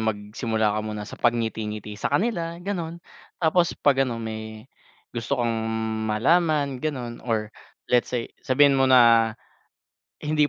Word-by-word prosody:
magsimula 110 Hz, 0 st, -1 dB
ka 110 Hz, -, 0 dB
muna 105 Hz, -1 st, -5 dB
sa -, -, -10 dB
pagngiti-ngiti 110 Hz, -3 st, -1 dB
sa -, -, 0 dB
kanila 170 Hz, -6 st, 0 dB
ganun, 170 Hz, -5 st, -3 dB, 0.4 s
tapos 170 Hz, +1 st, +3 dB
pag 135 Hz, -2 st, +3 dB
ano 120 Hz, -, -3 dB
may, 110 Hz, -1 st, -6 dB, 0.5 s
gusto 120 Hz, +4 st, -1 dB
kang 120 Hz, -1 st, +1 dB, 0.6 s
malaman 140 Hz, +3 st, +2 dB
ganon 125 Hz, -6 st, -4 dB
or 110 Hz, -3 st, -1 dB, 0.4 s
let's 125 Hz, -1 st, +3 dB
say 120 Hz, -2 st, -3 dB
sabihin 140 Hz, +1 st, +4 dB
mo 135 Hz, -, +4 dB
na, 115 Hz, -3 st, +6 dB, 0.9 s
"Hindi 150 Hz, -1 st, +2 dB
120 Hz, 130 wpm, -24 LUFS, 110-150 Hz, 0.9 s, na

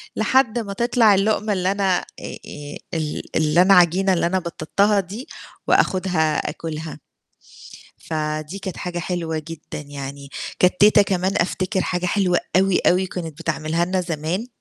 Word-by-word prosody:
لحد 240 Hz, +1 st, +2 dB
ما 200 Hz, -3 st, -4 dB
تطلع 235 Hz, -2 st, +4 dB
اللقمة 210 Hz, +2 st, +1 dB
اللي 185 Hz, 0 st, 0 dB
أنا 195 Hz, -2 st, +1 dB
آآ -, -, -9 dB, 0.2 s
آآ 145 Hz, 0 st, -8 dB, 0.2 s
ال 155 Hz, -2 st, -2 dB, 0.2 s
اللي 155 Hz, +2 st, +4 dB
أنا 195 Hz, +2 st, +6 dB
عجينة 185 Hz, +2 st, +4 dB
اللي 175 Hz, -, +1 dB
أنا 185 Hz, +2 st, +1 dB
بططتها 200 Hz, +4 st, +1 dB
دي 200 Hz, +8 st, -6 dB, 0.4 s
وآخذها 180 Hz, -5 st, +2 dB
آكلها. 160 Hz, 0 st, -6 dB, 1.0 s
فدي 155 Hz, +2 st, -3 dB
كانت 190 Hz, -3 st, -5 dB
حاجة 175 Hz, -1 st, -4 dB
حلوة 170 Hz, -2 st, -3 dB
جدًا 165 Hz, -2 st, -7 dB
يعني، 140 Hz, 0 st, -7 dB, 0.3 s
كانت 180 Hz, 0 st, +4 dB
تيتة 210 Hz, 0 st, +7 dB
كمان 190 Hz, -1 st, 0 dB
أفتكر 185 Hz, +3 st, 0 dB
حاجة 180 Hz, 0 st, -2 dB
حلوة 180 Hz, -2 st, +2 dB, 0.2 s
أوي، 190 Hz, 0 st, +3 dB
أوي 185 Hz, +1 st, +3 dB
كانت 165 Hz, -4 st, -6 dB
بتعملها 165 Hz, 0 st, -1 dB
لنا 185 Hz, +1 st, 0 dB
زمان 170 Hz, +5 st, -3 dB
180 Hz, 150 wpm, -22 LUFS, 160-195 Hz, 1.0 s, تيتة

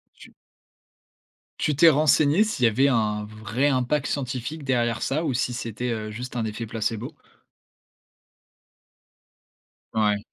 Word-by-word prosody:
Tu -, -, -15 dB, 1.3 s
tu 150 Hz, -, +1 dB
t'es 165 Hz, +4 st, +7 dB
renseigné, 155 Hz, +4 st, +4 dB
s'il 215 Hz, -, -1 dB
y -, -, +7 dB
avait 130 Hz, +5 st, +3 dB
un 105 Hz, -4 st, 0 dB
vrai 110 Hz, +5 st, -2 dB
impact 135 Hz, +2 st, 0 dB
scientifique 135 Hz, +3 st, -4 dB
derrière 120 Hz, -3 st, 0 dB
ça, 155 Hz, +5 st, -1 dB
ou 140 Hz, -5 st, -1 dB
si 125 Hz, +1 st, 0 dB
c'était, 120 Hz, 0 st, -4 dB
heu, 110 Hz, -2 st, -3 dB
juste 125 Hz, +3 st, -7 dB
un 115 Hz, -, -1 dB
effet 110 Hz, +2 st, -4 dB
placebo? 115 Hz, +5 st, -3 dB, 2.8 s
Ouais. 105 Hz, -2 st, +2 dB
125 Hz, 130 wpm, -24 LUFS, 110-140 Hz, 2.8 s, t'es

